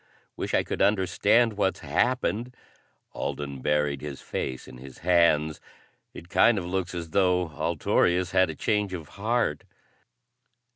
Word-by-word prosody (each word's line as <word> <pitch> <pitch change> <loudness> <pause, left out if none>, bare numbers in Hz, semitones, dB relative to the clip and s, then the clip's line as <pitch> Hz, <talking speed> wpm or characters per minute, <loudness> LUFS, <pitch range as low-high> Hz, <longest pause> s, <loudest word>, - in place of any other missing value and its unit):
Wish - - -2
I - - +3
could - - -4
understand 105 +4 +3
what's 100 -2 -1
happened." 120 - -1 0.6
Alden 70 -2 -4
buried 75 -1 0
his 75 -2 -6
face 65 -1 -5
in 60 - -12
his 65 0 -11
hands. 80 -4 +3 0.5
"It 85 - -11
kind 115 +5 +4
of 90 - -3
looks 90 0 -3
as 85 -2 -6
though 90 -2 +2
Altorius 85 +3 +1
had 95 -2 +3
a 80 - -5
change 105 +1 0
of 80 -4 -9
heart." 110 -7 -1
90 Hz, 140 wpm, -26 LUFS, 75-100 Hz, 0.6 s, kind